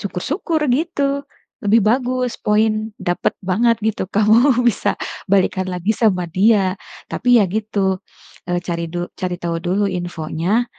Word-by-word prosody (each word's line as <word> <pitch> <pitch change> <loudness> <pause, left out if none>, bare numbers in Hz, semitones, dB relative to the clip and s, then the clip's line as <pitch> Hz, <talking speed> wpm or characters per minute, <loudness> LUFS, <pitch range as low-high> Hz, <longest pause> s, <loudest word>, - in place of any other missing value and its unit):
syukur-syukur 300 - -2
gitu, 280 -1 -1 0.3
lebih 215 +3 +4
bagus, 250 +1 0
poin 215 +1 +1
dapet 175 0 -1
banget 230 +5 +2
gitu 215 -4 -1
kamu 230 +5 +4
bisa 240 -4 +1 0.3
balikan 190 -1 +2
lagi 180 +4 -1
sama 200 -5 +1
dia. 190 +2 +3 0.4
Tapi 245 0 +3
ya - - +4
gitu, 200 -2 -1 0.5
eee, 175 0 0
cari 170 -2 -3
du 175 0 -3
cari 180 -1 -2
tahu 170 -1 -1
dulu 190 +4 +1
infonya. 175 +4 -1
210 Hz, 135 wpm, -19 LUFS, 180-240 Hz, 0.5 s, lebih